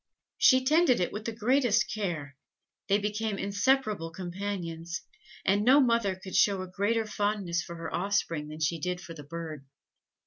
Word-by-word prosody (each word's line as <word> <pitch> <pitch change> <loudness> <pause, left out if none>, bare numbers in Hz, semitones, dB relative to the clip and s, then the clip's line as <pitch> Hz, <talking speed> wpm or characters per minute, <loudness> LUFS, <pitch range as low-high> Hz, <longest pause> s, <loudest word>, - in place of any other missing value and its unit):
She 260 -1 +6
tended 310 - +4
it 180 - 0
with 210 +1 -6
the 230 - -1
greatest 240 +1 +2
care; 165 -9 -3 0.5
they 200 - +4
became 210 0 -2
inseparable 205 -3 +1
companions, 175 -1 -5 0.4
and 200 +2 +3
no 260 +5 +6
mother 230 -7 +2
could 190 0 -8
show 195 -2 +3
a - - -7
greater 220 +4 0
fondness 205 -5 -1
for 170 - -8
her 165 -1 -6
offspring 175 -5 -1
than 155 +1 -9
she 160 +2 0
did 180 +3 -2
for 180 -2 -9
the 155 - -9
bird. 160 -1 -7
195 Hz, 165 wpm, -29 LUFS, 170-215 Hz, 0.5 s, She